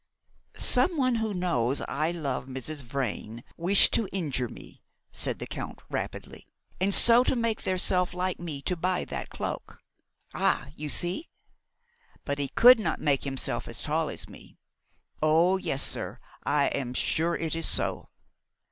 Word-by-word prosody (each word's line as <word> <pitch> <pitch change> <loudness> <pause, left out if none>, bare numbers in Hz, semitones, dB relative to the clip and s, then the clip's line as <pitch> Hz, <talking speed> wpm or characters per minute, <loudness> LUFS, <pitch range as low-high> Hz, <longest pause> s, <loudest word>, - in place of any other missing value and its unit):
"Some 355 -3 +2
one 255 -3 +2
who 220 -1 -1
knows 145 - 0
I 155 +3 -1
love 145 -7 -3
Mrs. 135 +3 -5
Vrain 120 -3 -4
wish 185 +4 +5
to 220 - +2
injure 140 -10 -2
me," - - -13 0.3
said - - +1
the - - -6
Italian - - -6
rapidly, - - -5 0.3
"and 190 +2 +1
so 235 +4 +7
make 230 -2 -1
theirself 180 -1 +1
like 185 +1 -2
me 155 -5 -6
to 180 - -1
buy 180 +2 -1
that 70 -3 -6
cloak. - - -6 0.6
Ah! 140 - 0
you 150 0 -5
see? 175 - 0 1.0
But 140 -1 -2
he 140 - 0
could 245 - +7
not 215 - -2
make 140 -2 +1
himself 135 -1 -1
as - - -5
tall - - 0
as - - -6
me. - - -15 0.6
Oh, 165 +5 +4
yes, 140 -7 0
sir, - - 0 0.3
I 145 -1 +2
am 125 -2 -3
sure 165 +6 +1
it 165 -1 -2
is 165 -1 -1
so." - - -1
165 Hz, 155 wpm, -27 LUFS, 140-185 Hz, 1.0 s, so